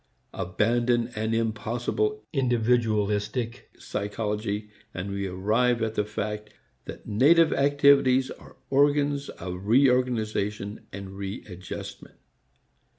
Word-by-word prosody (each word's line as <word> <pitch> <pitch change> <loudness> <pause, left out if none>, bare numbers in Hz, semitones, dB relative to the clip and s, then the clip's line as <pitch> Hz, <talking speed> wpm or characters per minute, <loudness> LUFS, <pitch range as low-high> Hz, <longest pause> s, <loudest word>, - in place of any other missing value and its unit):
Abandon 115 +6 +1
an 110 -1 -3
impossible 115 - -1
individualistic 115 -3 0
psychology, 105 0 -3 0.2
and 95 +2 -4
we 100 0 -2
arrive 110 +6 +1
at 110 -1 -1
the 105 -1 0
fact 105 0 -4 0.4
that - - -9
native 155 +10 +5
activities 140 -2 +4
are - - -13
organs 145 0 +2
of 90 +2 -7
re 130 +4 +6
organization 110 -4 -1
and 100 0 -7
re 100 +1 -6
adjustment. 90 -2 -8
110 Hz, 100 wpm, -26 LUFS, 105-125 Hz, 0.4 s, re